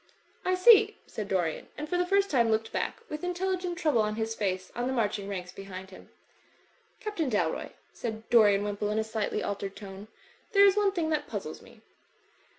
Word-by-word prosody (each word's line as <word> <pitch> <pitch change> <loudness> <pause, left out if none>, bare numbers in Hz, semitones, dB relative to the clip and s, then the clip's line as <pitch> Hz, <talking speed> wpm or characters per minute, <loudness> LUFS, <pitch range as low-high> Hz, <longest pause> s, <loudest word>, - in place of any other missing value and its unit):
'1 370 0 +1
see," 430 +1 +7
said 210 -2 -6
Dorian; 175 -5 -1
and 300 - -4
for 355 - -2
the 355 0 +1
first 395 +1 +2
time 235 -5 +3
looked 220 0 0
back - - -2
with 305 +3 -6
intelligent 360 0 -2
trouble 305 -10 +2
on 215 0 -1
his 225 0 -2
face, 185 -4 -2
on 245 +1 -1
the 260 - -1
march 215 -4 0
ing 200 0 -7
ranks 180 -2 -5
behind 190 0 -9
him. 185 - -13 0.9
"Captain 415 -10 -2
Dalroy," 180 -8 0 0.2
said 220 -2 -5
Dorian 205 -4 +6
Wimpole, 205 0 -2
in 210 - -1
a 220 - +2
slight 220 -1 -2
ly - - -1
altered 200 -1 -4
tone, 200 0 -9 0.5
"there 400 0 +8
is 395 -1 +5
one 410 -1 +3
thing 335 -5 -1
that 300 -1 0
puzzles - - -5
me. - - -17
225 Hz, 200 wpm, -29 LUFS, -, 0.9 s, there